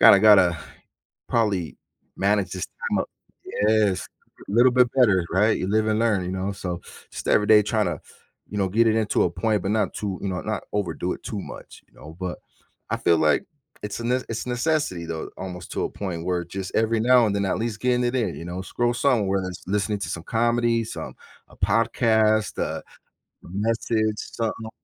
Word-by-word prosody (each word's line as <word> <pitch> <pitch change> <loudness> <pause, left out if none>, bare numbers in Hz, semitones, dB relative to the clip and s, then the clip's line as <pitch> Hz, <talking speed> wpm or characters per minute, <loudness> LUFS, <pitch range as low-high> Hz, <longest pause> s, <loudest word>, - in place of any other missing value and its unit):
gotta 100 - +8
gotta 95 -6 +6 0.7
probably 100 -8 0 0.4
manage 100 -2 +1
this 90 -2 -3
time - - -3
up." - - -3 0.6
Yes! 105 -3 +2 0.4
A - - -5
little 120 +3 +5
bit 125 -1 +5
better, 105 -9 +4
right? 105 +5 +3
You 95 - -2
live 110 +1 +2
and 110 0 +1
learn, 110 -5 +2
you 90 - -3
know, 95 +1 -2
so 90 -3 -5 0.3
just - - -7
every 105 - +4
day 105 0 +7
trying 105 +1 0
to, - - -3 0.5
you 105 - -3
know, 95 -1 +1
get 115 +5 +3
it 110 - +2
into 110 -2 +2
a 90 - +1
point, 100 +3 0
but 95 - -1
not 110 -1 0
too 100 -3 -3
you 100 - -2
know, 90 -1 -2
not 110 -1 -3
overdo 95 -3 -1
it - - -13
too 105 - -4
much, - - -10
you - - -32
know, 80 +2 -11
but 90 -1 -4 0.5
I - - +1
feel 85 - +3
like 75 - +3 0.4
it's 105 -1 -4
a - - -5
n 120 - +1 0.2
it's 115 +1 -4
necessity 125 - -1
though, 80 -1 -4
almost 90 -2 -7
to - - -1
a - - -2
point 90 -5 -5
where 90 -1 0
it 85 - -12
just 95 -1 -5
every 110 0 +2
now 125 0 +5
and 100 - 0
then 100 - 0
at - - 0
least 110 -1 -3
getting 125 -1 +2
it 120 +1 0
in, 120 - 0
you - - -7
know, 90 +2 -5
scroll 120 +5 -1
somewhere, 110 -7 +2
lis 90 -2 -7
listening 105 +2 0
to - - -3
some 85 - -4
comedy, 115 +1 +1
some - - -7 0.3
a - - -18
podcast, 110 -2 +2
a - - -1 0.7
a - - -11
message, 110 +2 0
something 110 0 -4
105 Hz, 210 wpm, -24 LUFS, 95-115 Hz, 0.7 s, gotta